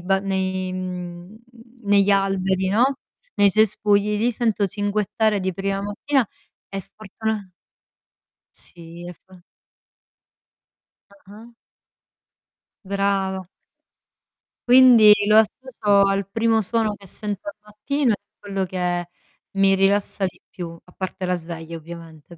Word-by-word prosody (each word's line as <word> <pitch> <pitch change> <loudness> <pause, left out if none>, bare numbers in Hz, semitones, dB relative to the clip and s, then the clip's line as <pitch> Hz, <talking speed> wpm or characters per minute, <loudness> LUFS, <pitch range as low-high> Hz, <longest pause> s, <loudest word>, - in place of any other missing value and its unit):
ba 195 +2 +2
nei 190 -1 -2
mhmm, 180 +1 -6 0.5
negli 200 0 +4
alberi, 190 -1 +1
no. 245 +8 +2 0.4
Nei 200 - +6
cespugli, 210 0 +2
li 235 +3 +2
sento 220 -3 0
cinguettare 205 +2 0
di 185 -1 -2
prima 195 +1 -2
mattina 225 +5 -1 0.4
e 195 0 -5
fortuna 215 -1 -4 1.1
Sì 170 0 -11
e 175 - -7
fo 185 +1 -20 1.7
Ah-ah. 200 +3 -15 1.4
Brava. 195 -1 -1 1.2
Quindi 245 -4 +8
lo 215 +1 +6
associo 215 -3 +2
al 195 -1 -1
primo 225 +1 +2
suono 220 +1 0
che 200 - -16
sento 205 +1 -6
al 205 - -5
mattino 235 +6 -1
e 210 - +2 0.2
quello 195 -2 -3
che 175 -1 -2 0.4
mi 195 0 +3
rilassa 195 +1 +1
di 185 - -7
più, 170 -2 -8
a 180 - -20
parte 185 0 -5
la 180 0 0
sveglia 165 0 -7
ovviamente 165 0 -12
195 Hz, 115 wpm, -22 LUFS, 185-210 Hz, 1.7 s, Quindi